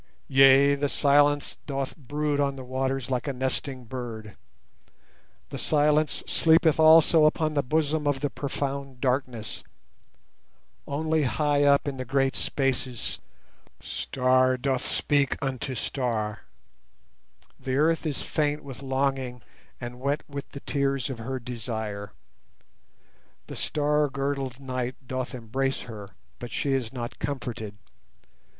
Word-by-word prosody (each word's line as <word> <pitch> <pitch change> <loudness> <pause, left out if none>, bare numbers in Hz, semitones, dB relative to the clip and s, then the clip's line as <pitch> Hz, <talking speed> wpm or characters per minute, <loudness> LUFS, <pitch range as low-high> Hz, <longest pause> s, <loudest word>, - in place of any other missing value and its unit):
Yea, 135 +1 +7
the 140 0 0
silence 145 0 +3
doth 135 -2 -3
brood 145 0 -2
on 140 -1 +1
the 130 - -7
waters 130 0 -2
like 125 +2 -1
a 140 - -1
nesting 130 0 -2
bird; 110 -4 -7 1.1
The - - -6
silence 150 0 +2
sleepeth 160 -1 +4
also 160 0 +7
upon 155 0 +2
the 145 - +2
bosom 150 +2 0
of 145 -2 +1
the 145 -2 -1
profound 140 -2 -4
darkness, 125 -4 -2 1.2
Only 155 +2 0
high 145 +2 +2
up 140 0 +4
in 140 -2 -3
the 130 - -3
great 135 0 +1
spaces 130 +1 -1 0.6
star 130 0 +1
doth 130 0 0
speak 140 -2 +2
unto 135 -1 -3
star, 110 -4 -2 1.1
The 130 -1 -2
Earth 160 +3 +2
is 145 - -2
faint 150 -1 -1
with 135 -2 -9
longing 135 -2 -1 0.4
and 120 0 -7
wet 140 +3 -1
with 140 -1 -7
the 140 - -9
tears 140 -2 0
of 125 - -6
her 130 +3 -4
desire; 110 -4 -5 1.3
The - - -8
star 150 0 +1
girdled 135 -2 -3
night 130 -2 -3
doth 130 0 -3
embrace 130 +3 -2
her, 105 -5 -9 0.2
but 120 - -6
she 140 - -1
is 125 -4 -1
not 120 -2 -6
comforted. 120 -7 -4
135 Hz, 130 wpm, -27 LUFS, 125-145 Hz, 1.3 s, Yea